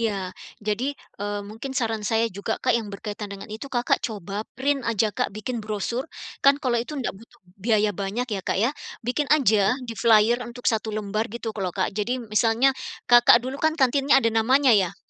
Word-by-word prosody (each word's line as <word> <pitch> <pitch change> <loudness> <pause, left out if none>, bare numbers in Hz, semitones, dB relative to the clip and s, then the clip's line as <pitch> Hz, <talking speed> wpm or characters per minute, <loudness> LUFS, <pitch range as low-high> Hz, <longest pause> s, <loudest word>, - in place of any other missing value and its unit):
Iya, 225 -2 +1 0.5
jadi, 215 +4 0 0.4
eee, 205 0 -2
mungkin 235 +5 -7
saran 225 -4 0
saya 225 +1 +3
juga, 220 +2 -2
Kak, 255 - +4
yang 225 -2 -1
berkaitan 205 0 -6
dengan 200 0 -8
itu, 250 +6 -7
Kakak 240 -2 +1
coba 205 -2 -4 0.2
print 275 +1 +1
aja 220 -2 +1
Kak - - -1
bikin 230 +2 -4
brosur, 215 +7 -3 0.4
kan 275 0 +7
kalau 240 -3 +1
itu 245 - -6
ndak 250 - -2
butuh 225 +4 -18 0.2
biaya 215 -2 +3
banyak 200 +6 -2
ya, 195 - -1
Kak, - - -2
ya. 230 +7 +2 0.3
Bikin 265 +4 -1
aja 220 -4 +3
di 230 - -5
flyer 230 +1 +4
untuk 245 +1 -11
1 220 0 -2
lembar 215 +1 -2
gitu 230 0 -5
kalo 195 -4 -2
Kak. 185 - 0
Jadi 235 +4 -2
misalnya, 225 +5 +3 0.3
Kakak 240 -1 +7
dulu 265 +2 -5
kan 315 0 +2
kantinnya 275 0 +3
ada 230 -4 +3
namanya 255 +4 +4
ya? 190 -5 +2
225 Hz, 190 wpm, -24 LUFS, 210-250 Hz, 0.5 s, kan